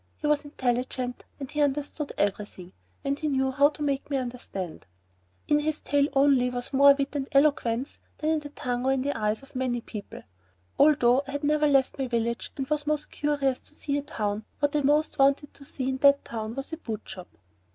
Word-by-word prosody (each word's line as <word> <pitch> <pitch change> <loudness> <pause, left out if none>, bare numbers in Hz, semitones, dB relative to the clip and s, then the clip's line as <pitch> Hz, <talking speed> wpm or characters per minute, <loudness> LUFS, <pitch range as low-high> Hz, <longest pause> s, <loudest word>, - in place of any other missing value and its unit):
He - - -6
was 295 0 +2
intelligent, 250 -2 -2
and 275 -2 -6
he 300 - -1
understood 290 +1 -1
every 205 +1 0
thing, 180 -2 -13 0.3
and 280 +1 0
he 310 - -1
knew 265 -2 +1
how 280 +2 +5
to 300 0 -7
make 280 -1 -1
you 280 - 0
understand. 240 - -6 0.6
In 295 0 +4
his 310 +1 -1
tail 285 0 +2
only 270 -3 +4
was 245 +2 -5
more 280 +1 +7
wit 275 +1 -3
and 275 -2 -2
eloquence 275 -3 +2 0.2
than 310 0 0
in 320 - +2
the 295 -1 -9
tongue 245 -3 -3
or 265 - +2
in 260 -1 0
the 285 +1 -1
eyes 215 +3 -1
of 275 - -17
many 255 -2 0
people. 215 -3 -9 0.6
Although 265 -4 +5
I 275 - -6
had 285 +1 -3
never 300 +1 +3
left 275 -1 +2
my 265 - 0
village 235 -1 -2
and 270 -1 -3
was 295 0 -1
most 300 0 -1
curious 285 -3 0
to 300 - -18
see 285 -2 -2
a 285 - 0
town, 210 -6 -3
what 290 0 0
I 295 - +3
most 295 +2 +2
wanted 275 +2 +3
to 280 - -14
see 265 -2 -4
in 265 - -1
that 280 +1 +5
town 220 0 -5
was 275 +4 -6
a - - -2
boot 225 -9 -5
shop. 185 -2 -10
275 Hz, 215 wpm, -27 LUFS, 245-290 Hz, 0.6 s, more